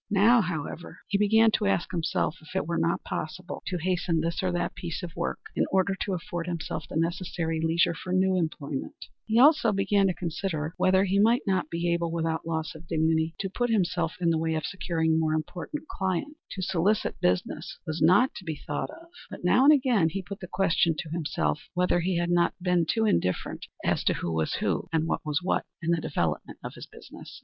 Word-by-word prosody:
Now, 220 +4 +5
however, 165 -1 -5
he 200 - +1
began 220 +2 +5
to 210 -1 +1
ask 195 - 0
himself 165 -2 -1
if 160 - -13
it - - 0
were 170 +1 -1
not 170 +1 0
possible 180 +4 -5
to 180 - -1
hasten 175 -1 0
this 165 +2 -1
or 185 -1 0
that 175 0 -1
piece 175 +1 -5
of 170 -2 -7
work 170 - -2 0.2
in - - +1
order 190 0 +2
to 195 - -1
afford 175 -1 -5
himself 160 -3 -4
the - - -7
necessary 165 -1 -1
leisure 165 +1 +2
for 180 +2 -7
new 185 0 +3
employment. 155 -5 -3 0.3
He 220 - -1
began 240 - +7
also 290 -6 +5
to 195 -1 +2
consider 165 -2 -3
whether 190 +1 +4
he 195 0 +1
might 230 +4 +4
not 185 -5 0
be 170 +1 0
able, 170 -1 -1
without 165 -1 -2
loss 160 -1 -2
of 160 +1 -13
dignity, 160 +1 +1
to 195 - -1
put 245 +4 -1
himself 175 -6 +1
in 170 -2 +2
the 160 - +1
way 160 0 0
of 155 - -2
securing 165 -4 0
more 155 -1 +1
important 180 - -5
clients. 190 - -2
To 190 - -4
solicit 190 +4 0
business 90 0 -1
was 155 0 -3
not 185 +11 +5
to - - -8
be 160 -3 -3
thought - - -4
of, 330 +2 -12 0.2
but - - -9
now 250 +9 +5
and 295 - +9
again 250 - +3
he 190 +3 -4
put 200 +2 -8
the 180 - -7
question 170 -3 +2
to 155 - -5
himself 160 -2 -2
whether 180 0 +2
he 175 +1 0
had 175 0 0
not 175 0 +3
been 180 -2 +1
too 225 +4 +1
indifferent 90 - 0 0.2
as - - +1
to - - +3
who 85 - -3
was 80 -1 0
who, - - 0
and 160 -1 +1
what - - -1
was 150 0 -1
what, 185 - 0
in 170 0 -1
the 170 -1 +1
development 80 - -2
of - - -6
his - - -10
business. - - -12
175 Hz, 215 wpm, -27 LUFS, 160-195 Hz, 0.3 s, and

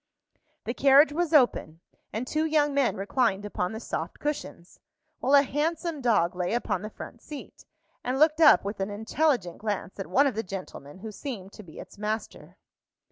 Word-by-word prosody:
The 235 - -3
carriage 280 +3 +5
was 345 0 -1
open, 245 - +3 0.3
and 225 +4 -3
two 305 +4 -1
young 300 -2 +2
men 275 -3 +2
reclined 205 0 0
upon 180 -3 -2
the 220 - -6
soft - - -5
cushions, 290 - -5 0.4
while 270 +3 +3
a 280 - +7
handsome 310 +2 -2
dog 210 -9 +2
lay 180 +4 -1
upon 215 -6 -1
the 215 - -6
front 235 +2 -10
seat, 295 -2 -10 0.4
and 250 +2 -1
looked 310 +2 +3
up 300 -9 +7
with 200 +1 -4
an 195 +1 -2
intelligent 220 - 0
glance 205 -2 -4
at 195 - -4
one 280 - +4
of 275 - +1
the 220 - -2
gentlemen, 185 -7 -8
who 215 +3 -8
seemed 205 -5 -7
to - - -10
be 165 -6 -14
its - - -12
master. 215 +1 -5
235 Hz, 185 wpm, -27 LUFS, 200-290 Hz, 0.4 s, a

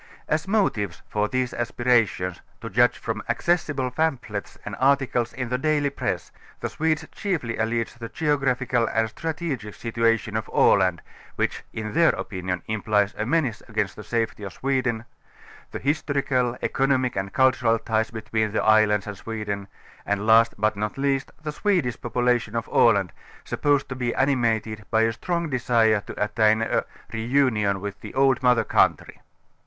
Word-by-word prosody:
As 155 +4 0
motives 115 - 0
for 105 0 0
these 130 +1 -1
aspirations, 115 -7 +1 0.2
to 115 - -6
judge 120 0 +4
from 110 -1 -4
accessible 145 -2 0
pamphlets 125 -9 -2
and - - -5
articles 130 -3 +2
in 125 0 -4
the 125 0 -1
daily 145 -1 +1
press, - - -3 0.3
the - - -3
Swedes 160 -1 0
chiefly 165 - -2
allege 115 +1 -1
the 115 -1 -8
geographical 130 -5 +1
and 110 0 0
stra 160 +4 -4
tegic 130 -11 -4
situation 115 -2 0
of 110 -3 -2
Aland, 90 -3 +3 0.3
which - - -1
in 110 -1 -5
their 165 +2 +5
opinion 90 -3 -4
implies 105 -1 +1
a 105 - -3
.menace 140 -6 0
against - - -2
the - - -9
safety 115 -2 -2
of 100 -2 -6
Sweden, 130 -4 -1 0.6
the - - -5
historical, 140 -4 0
econo 135 0 +2
mic 125 -1 -2
and 95 0 -3
cultural 130 -3 +3
ties 110 0 -1
between 110 -1 -2
the - - +1
islands 110 -2 +4
and 105 - -6
iSweden, 100 -2 -5 0.4
and 100 +1 -1
last 115 +1 +5
but 110 +1 +1
not 105 +3 -3
least 135 -1 0
the 150 - -3
Swedish 170 - 0
population 120 -1 0
of 115 0 -2
Aland, 100 -7 +4 0.3
supposed 145 -2 +1
to 130 - -4
be 125 -2 -2
animated 115 -5 +1
by 110 0 +3
a 115 0 +1
strong 170 +6 -2
desire 115 -4 +3
to - - -8
attain 110 +1 +2
a,, - - 0 0.3
reunion 110 -4 +1
w├Āth 100 0 -6
the - - -9
old 135 -1 +3
mother 125 -2 +4
country". - - +1
115 Hz, 160 wpm, -24 LUFS, 110-135 Hz, 0.6 s, their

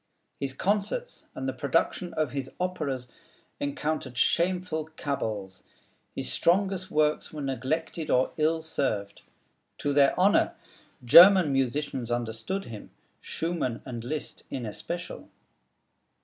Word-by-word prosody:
His 135 -1 -3
concerts 210 - -2
and 130 - -4
the 130 - -1
production 165 +6 0
of 155 -4 0
his 135 -2 -4
operas 150 -9 -2 0.5
encountered 145 -3 -3
shameful 175 +1 +1
cabals. 105 -9 -3 0.5
His - - -2
strongest 190 +1 +1
works 150 0 +1
were 150 -2 -6
neglected 155 +5 -2
or 125 +1 +3
ill 160 +1 +1
served. 110 -10 -2 0.6
To 145 - -1
their 140 +2 +4
honor, 195 +3 +4 0.5
German 175 +3 +9
musicians 135 -1 -1
understood 120 - -3
him, 110 -3 -9 0.3
Schumann 165 -8 -2
and 120 -3 -6
Liszt 150 +5 -5
in 130 -3 -4
especial. 170 - -6
145 Hz, 115 wpm, -28 LUFS, 130-170 Hz, 0.6 s, German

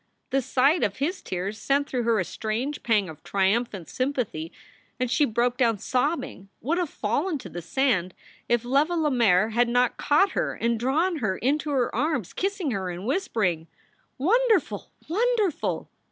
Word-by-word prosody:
The 270 - +2
sight 275 +6 +2
of 205 -2 0
his 335 +8 -2
tears 190 +4 -4
sent 280 +1 +1
through 250 - -1
her 230 -1 +3
a 185 - 0
strange 225 - -3
pang 215 -5 +2
of 160 -2 -10
triumphant 195 -1 0
sympathy, 250 - -2 0.5
and 250 -1 -1
she 275 +3 +4
broke 240 +1 0
down 230 -4 +2
sobbing, 250 - -2
would 330 +8 0
have 350 -4 -1
fallen 290 - -1
to 250 - -9
the 175 - -6
sand, 185 - 0 0.3
if 240 0 +2
Leva 285 +7 +2
Lemaire 235 - +3
had 235 +2 +2
not 245 0 +2
caught 375 +7 +3
her - - -1
and 235 -1 0
drawn 315 +9 +1
her 205 -9 -1
into 295 +4 0
her 265 -4 0
arms, 255 - -1
kissing 390 -6 -1
her 190 -4 -2
and 175 +2 -6
whispering: 220 - 0 0.5
Wonderful! 380 - +2 0.2
Wonderful 420 - 0
250 Hz, 165 wpm, -26 LUFS, 210-300 Hz, 0.5 s, she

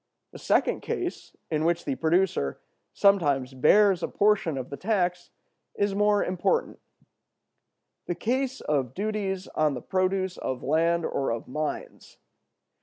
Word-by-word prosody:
The - - -11
second - - +1
case, 355 -1 -4 0.2
in 155 -1 0
which 170 +1 0
the 140 - -1
producer 160 - +1 0.3
sometimes 145 -10 +2
bears 190 +7 +4
a - - -1
portion 200 -8 +1
of 130 0 -6
the - - -3
tax, 180 -1 -1 0.5
is 200 -1 0
more 205 0 +2
important: 185 - 0 1.3
the 175 - -1
case 260 +5 -1
of 135 -5 -1
duties 200 -2 -2
on 155 -2 +1
the 125 - -6
produce 185 0 -1
of 130 -1 -4
land 165 +3 +2
or 135 - -1
of 115 0 -3
mines. 150 +3 -5
175 Hz, 135 wpm, -26 LUFS, 150-200 Hz, 1.3 s, bears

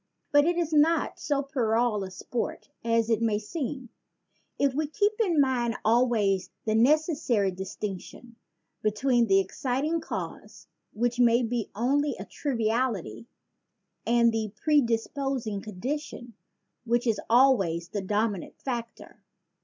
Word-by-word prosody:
But 290 0 +5
it 345 +1 +1
is 330 -2 -1
not 310 +2 +2
so 285 -1 0
puerile 230 -5 0
a 190 - -6
sport 225 +5 -5
as 230 -1 +2
it 225 -1 +1
may 220 -2 +2
seem 260 +2 -5 0.7
if 280 -2 +2
we 305 +2 -1
keep 410 +7 +1
in 355 -9 +2
mind 250 -4 +1
always 215 -5 +2 0.2
the 215 - +1
necessary 255 - +2
distinc 190 +1 -5
tion 240 -2 -14 0.5
between 235 +3 +2
the 195 -1 +4
exciting 270 - -1
cause, - - -7 0.3
which 240 +2 -1
may 240 0 +4
be 230 -1 -2
only 280 +6 +1
a - - -7
triviality 220 - -2 0.8
and 235 0 +3
the 220 -2 -2
predisposing 255 -4 0
condition, 240 +4 -5 0.5
which 240 +1 0
is 225 -3 +1
always 200 -10 +3
the 205 - -3
dominant 205 -1 -2
factor. 235 -4 -6
235 Hz, 130 wpm, -27 LUFS, 215-275 Hz, 0.8 s, But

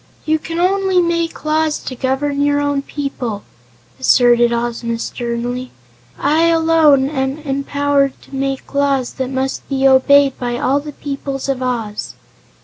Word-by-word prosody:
"You 315 0 +1
can 330 +2 -6
only 380 0 +2
make 335 -2 -1
laws 310 0 +1
to 255 - -5
govern 275 +3 -1
your 285 0 +2
own 285 -1 0
people," 265 -7 -4 0.6
asserted 240 -1 +4
Ozma 235 0 -2
sternly. 240 +2 -4 0.5
"I, 310 +4 +2
alone, 320 -4 +4
am 270 -1 -2
empowered 280 -1 0
to 275 - -11
make 270 0 -3
laws 275 -3 +1
that 260 -1 -3
must 265 0 -3
be 270 -1 +2
obeyed 275 +1 +4
by 240 -1 -2
all 270 +3 +1
the 295 0 -8
peoples 275 -1 -5
of 270 -2 -1
Oz." 230 -5 -3
275 Hz, 145 wpm, -17 LUFS, 255-295 Hz, 0.6 s, asserted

